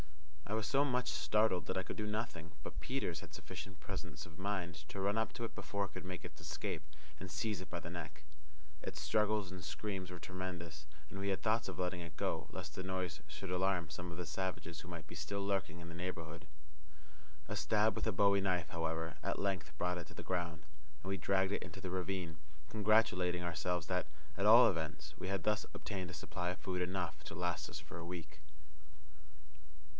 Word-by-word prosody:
I 105 - -1
was 110 -1 +2
so 140 0 +5
much 125 - +2
startled 90 +5 +3
that - - 0
I 95 - +2
could - - -4
do 105 - -1
nothing, 105 -7 -2
but - - -5
Peters 105 - 0
had - - -10
sufficient 95 -3 -6
presence - - -4
of 80 -2 -12
mind 95 -3 0
to 100 - -4
run 100 +2 +3
up 110 - +2
to 115 - -2
it - - -6
before 100 -1 0
it 95 - -9
could - - -5
make 90 -3 -4
its 75 -3 -8
escape, 75 0 -2 0.4
and 95 - -5
seize 110 -4 0
it 90 - -7
by 85 - -2
the 80 - -6
neck. 75 -4 -5 0.6
Its 75 - -4
struggles 105 +5 +3
and 90 -1 -6
screams 95 +4 -2
were 90 - -5
tremendous, 85 -5 -4 0.2
and 100 - -5
we 100 0 +1
had 95 - +1
thoughts 110 -1 +3
of 95 - -5
letting 90 -1 +1
it 85 -3 -8
go, - - 0
lest 90 -5 -5
the 95 - -2
noise 90 -5 -1
should 90 +5 -5
alarm 90 -2 +3
some 85 +2 -4
of 85 - -6
the 90 - -2
savages 85 -1 -2
who 90 - -9
might 85 -3 -5
be - - -8
still 100 0 -1
lurking 95 -4 +1
in 85 - -7
the 85 - -6
neighbourhood. 85 -2 -4 1.0
A - - -1
stab 110 0 +4
with - - 0
a - - +4
bowie 100 0 +6
knife, 90 -4 +2
however, 80 -1 0
at - - +1
length 95 -6 +1
brought 90 +1 +2
it 85 - -6
to - - -12
the - - -5
ground, 85 -2 -1 0.4
and 95 - -4
we 95 - +1
dragged 95 0 +3
it - - 0
into - - -7
the 95 -2 -3
ravine, 90 -3 -1 0.3
congratulating 105 -5 +4
ourselves 85 0 +1
that, 90 -3 +1 0.3
at 100 - +3
all 115 +3 +11
events, 80 -4 -1
we - - -3
had 95 -2 +1
thus 105 0 +3
obtained 95 -4 -3
a - - -6
supply 90 +2 -2
of 90 - -1
food 90 +4 -1
enough 90 -1 -1
to - - -5
last 90 0 0
us - - -4
for - - -8
a 85 - -5
week. 85 -1 -6
90 Hz, 215 wpm, -38 LUFS, 85-100 Hz, 1.0 s, all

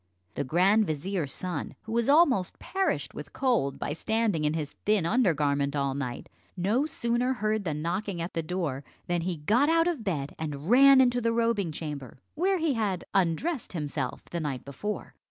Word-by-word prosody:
The - - -2
grand 190 +9 +3
vizier's 155 0 -2
son, 180 -5 -4
who 220 - -8
was 235 +2 +1
almost 280 - +4
perished 265 - -1
with 150 -1 -9
cold, 240 - +1
by 145 - -3
standing 215 -2 0
in 150 +1 +1
his 150 -3 -3
thin 210 -5 +2
under 210 -3 +3
garment 140 -1 0
all 140 -1 0
night, 130 -3 -4 0.3
no 215 - +1
sooner 240 -2 0
heard 215 -4 -1
the 155 -3 -1
knocking 175 +4 -2
at 170 +2 -4
the 165 - -1
door 155 -5 -3 0.2
than 175 -1 0
he 175 0 -2
got 220 - +2
out 330 +1 +4
of 320 -10 -1
bed, 150 -8 -2
and 150 +3 -4
ran 270 +1 +8
into 245 -1 +3
the 230 0 +1
robing 230 -6 +1
chamber, 150 -6 -6 0.2
where 375 +5 +1
he 320 -4 +1
had 205 -6 -1
undressed 195 - 0
himself 145 -5 -3
the 170 - -2
night 145 -5 -4
before. 175 +10 -5
185 Hz, 185 wpm, -28 LUFS, 150-235 Hz, 0.3 s, ran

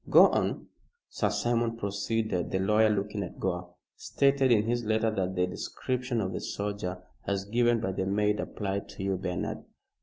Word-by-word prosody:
Go - - +8
on." - - -1 0.4
"Sir - - 0
Simon," 115 -1 0
proceeded 100 -2 -1
the 95 - 0
lawyer, 105 +3 +4
looking 105 0 -1
at 90 - -6
Gore, 90 -1 -3 0.2
"stated 140 -2 +2
in 105 -3 +5
his 120 +2 0
letter 110 0 +1
that 95 -3 -1
the 90 0 +2
description 125 +6 -3
of 95 -2 -2
the - - -3
soldier, 100 -3 -4 0.2
as 100 -1 -1
given 120 +2 +2
by 95 -4 -1
the 95 0 -2
maid, 105 +1 +1
applied 100 -1 -3
to - - -7
you, 95 0 +1
Bernard." 90 -1 -3
105 Hz, 175 wpm, -29 LUFS, 95-115 Hz, 0.4 s, Go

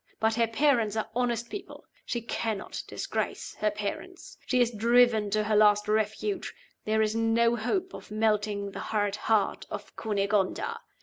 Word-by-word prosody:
But 220 0 +2
her 230 0 +2
parents 230 -3 +2
are 220 - -2
honest 240 -1 -1
people; 400 -1 -8 0.2
she 240 - -2
cannot 225 -2 -3
disgrace - - -3
her 215 - +2
parents. 210 - -6
She 255 - +2
is 240 -1 +3
driven 230 -1 +4
to 215 +1 +1
her 215 0 +1
last 210 0 +5
refuge 220 - -1 0.3
there 220 0 +2
is 215 0 0
no 230 +1 +3
hope 355 - -1
of - - -10
melting 210 -2 0
the - - -7
hard 205 -2 -1
heart 210 -1 0
of - - -7
Cunegonda. 200 -2 0
220 Hz, 160 wpm, -28 LUFS, 210-235 Hz, 0.3 s, last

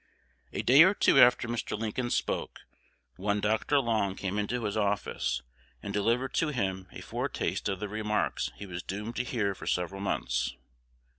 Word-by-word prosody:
A - - -3
day 135 +5 +7
or 190 +5 +7
two 135 - +5
after 125 -2 +6
Mr. 115 -2 -3
Lincoln 115 +3 -2
spoke, - - -2 0.6
one 100 +2 0
Dr. 110 +7 +1
Long 110 -6 0
came 100 +1 -2
into 115 +4 -2
his 105 -1 -2
office, 100 - -1 0.4
and 100 - -4
delivered 115 +5 +1
to 165 - +2
him 95 -9 -2
a - - -9
foretaste - - -2
of 95 -1 -2
the 105 - -3
remarks 105 0 -1
he 100 - -8
was 90 -2 -6
doomed 105 +6 -5
to 125 - +1
hear 110 -6 -1
for - - -10
several 90 +2 -1
months. 65 -10 -1
105 Hz, 170 wpm, -29 LUFS, 100-120 Hz, 0.6 s, day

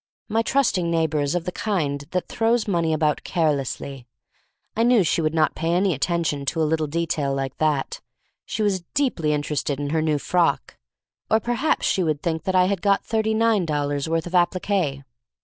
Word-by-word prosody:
My 225 +1 +1
trusting 230 -9 +1
neighbor 160 -2 +1
is 145 +3 -1
of 175 -1 -2
the 180 - -2
kind 150 -10 -2
that 180 0 -2
throws 225 0 +1
money 170 -4 +1
about 155 -1 +1
carelessly. 140 -5 -2 0.7
I 225 - 0
knew 235 -3 +5
she 165 0 +1
would 155 0 0
not 155 -1 +2
pay 165 +1 -1
any 185 +1 +2
attention 155 -1 -1
to 165 - -1
a - - +3
little 155 0 0
detail 150 -3 -1
like 135 -1 -3
that, 150 -3 -1 0.2
— - - -44 0.2
she 215 - -2
was 195 -3 +1
deeply 245 - +1
inter 150 0 -1
ested 140 -1 -1
in 145 0 -3
her 160 0 +1
new 155 -1 +1
frock; 170 0 0 0.5
or 220 - +4
perhaps 240 +6 0
she 190 - +1
would 155 -4 -1
think 160 0 -2
I 185 -1 +4
had 190 -1 -1
got 200 -1 +2
thirty 220 -1 0
nine 225 -3 +3
dol 145 -3 -1
lars' 145 +1 -2
worth 165 0 0
of 175 - -8
applique. 175 -5 +1
165 Hz, 200 wpm, -23 LUFS, 150-195 Hz, 0.7 s, knew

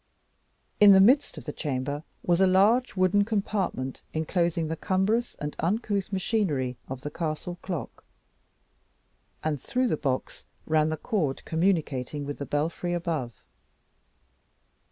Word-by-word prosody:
In 205 -1 +9
the 190 - +7
midst 255 +9 +4
of - - -9
the 150 - -5
chamber 145 +1 -3 0.2
was 175 +1 +2
a 190 - +6
large 210 +7 +3
wooden 185 +2 +3
compartment 200 - -2
enclosing 165 0 0
the 160 - -2
cumbrous 195 +8 0
and 150 -1 -5
uncouth 200 +1 -1
machinery 185 - 0
of 130 -1 -5
the 145 +1 -5
castle 170 +3 -4
clock, 180 -4 -5 1.4
and 150 -4 -1
through 255 0 0
the 155 - 0
box 130 -3 -2 0.2
ran 155 0 +2
the 155 - -2
cord 160 - -2
communicating 155 -5 0
with 145 0 -5
the 140 - -4
belfry 165 +4 -1
above. 160 - -3
170 Hz, 135 wpm, -27 LUFS, 150-195 Hz, 1.4 s, In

